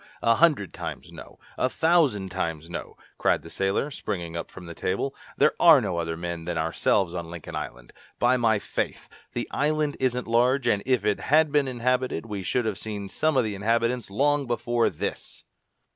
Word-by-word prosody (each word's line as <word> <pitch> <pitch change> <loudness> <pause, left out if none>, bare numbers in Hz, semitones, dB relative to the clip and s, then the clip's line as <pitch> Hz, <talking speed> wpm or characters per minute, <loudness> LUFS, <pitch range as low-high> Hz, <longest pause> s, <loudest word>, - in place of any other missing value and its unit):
a 115 - +5
hundred 145 - +3
times - - -7
no! - - -12 0.2
a 130 - +2
thousand 150 - +2
times 85 -3 -3
no!" - - -6 0.2
cried - - +2
the 80 - -10
sailor, 100 +9 0
springing 85 -9 -4
up 85 - -4
from 90 - -11
the 85 - -7
table. 95 +11 -2 0.2
"There - - +4
are - - +8
no 85 - -2
other 80 -1 -3
men 85 -1 -5
than 85 -1 -2
ourselves 85 +3 +1
on 85 -2 -5
Lincoln 85 -2 -8
Island! - - -7 0.2
By 125 +1 +3
my 115 -3 +3
faith! - - -4 0.3
The - - -3
island 150 0 0
isn't 125 -1 0
large, 125 +3 +3
and 105 -4 +2
if 130 -3 +2
it 105 - +1
had 155 +1 +3
been 145 -2 +3
inhabited, 125 0 0
we 105 -3 -5
should 120 +6 0
have 105 -3 -2
seen 105 -3 -5
some 155 +4 +1
of 130 - +4
the 110 -2 -2
inhabitants 115 +3 0
long 140 +6 +1
before 120 0 +1
this!" - - -6
115 Hz, 190 wpm, -26 LUFS, 90-130 Hz, 0.3 s, are